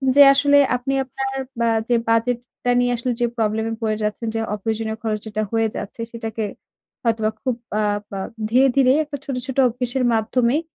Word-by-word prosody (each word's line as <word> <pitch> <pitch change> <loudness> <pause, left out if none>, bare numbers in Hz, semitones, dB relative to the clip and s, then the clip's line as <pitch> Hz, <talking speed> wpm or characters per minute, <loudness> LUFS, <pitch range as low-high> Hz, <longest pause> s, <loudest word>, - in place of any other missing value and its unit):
যে 285 - +8
আসলে 285 +1 +4 0.2
আপনি 250 +2 -2
আপনার 270 +1 -4 0.2
বা 235 0 +2 0.2
যে 240 - +4
বাজেটটা 245 +1 0
নিয়ে 245 0 +2
আসলে 245 +2 -1
যে - - +4
প্রবলেমে 220 +1 0
পরে 215 -1 0
যাচ্ছেন। 210 +2 -2
যে, - - 0
অপ্রয়োজনীয় 220 +1 -2
খরচ 215 -2 -1
যেটা 215 0 -2
হয়ে 225 -1 +2
যাচ্ছে, 210 +3 -6
সেটাকে 225 -1 -4 0.6
হয়তোবা 220 -2 +1
খুব 255 -2 0 0.3
আব 205 0 0 0.2
আ - - -3 0.3
ধীরে, 260 +3 +5
ধীরেই 265 +1 +5
একটা 290 -1 -6
ছোট, 270 - -4
ছোট 265 - -5
অভ্যাসের 250 +2 -2
মাধ্যমেই 235 +6 +1
235 Hz, 175 wpm, -21 LUFS, 220-255 Hz, 0.6 s, যে